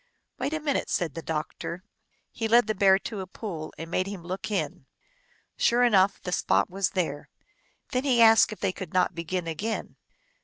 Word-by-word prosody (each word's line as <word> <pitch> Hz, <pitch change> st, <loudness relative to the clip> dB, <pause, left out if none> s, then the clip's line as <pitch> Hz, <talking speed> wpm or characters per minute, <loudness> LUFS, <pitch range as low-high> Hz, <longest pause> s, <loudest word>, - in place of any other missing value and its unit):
" -, -, -45 dB
Wait -, -, -1 dB
a 315 Hz, -, -1 dB
minute," 295 Hz, -2 st, -1 dB
said 165 Hz, -5 st, -1 dB
the 165 Hz, -, -6 dB
doctor. 160 Hz, +3 st, -4 dB, 0.5 s
He 225 Hz, -, -2 dB
led 235 Hz, +1 st, +5 dB
the 215 Hz, -, 0 dB
Bear 195 Hz, -1 st, +5 dB
to 205 Hz, +1 st, -6 dB
a 190 Hz, -, -5 dB
pool 180 Hz, -6 st, -6 dB
and 165 Hz, +1 st, -7 dB
made 185 Hz, +1 st, 0 dB
him 195 Hz, -4 st, -7 dB
look 185 Hz, +4 st, -5 dB
in. 165 Hz, -6 st, -3 dB, 0.7 s
Sure 240 Hz, +1 st, +3 dB
enough, 200 Hz, -5 st, +4 dB
the 180 Hz, -, -4 dB
spot 180 Hz, -, +1 dB
was 195 Hz, 0 st, 0 dB
there. 155 Hz, -5 st, -2 dB, 0.6 s
Then 255 Hz, +1 st, 0 dB
he 255 Hz, -4 st, +3 dB
asked 225 Hz, -1 st, +7 dB
if 215 Hz, -, -8 dB
they 195 Hz, -, +1 dB
could 185 Hz, -2 st, -8 dB
not 180 Hz, 0 st, +3 dB
begin 170 Hz, +1 st, -3 dB
again. 195 Hz, +8 st, -4 dB
190 Hz, 195 wpm, -27 LUFS, 170-220 Hz, 0.7 s, asked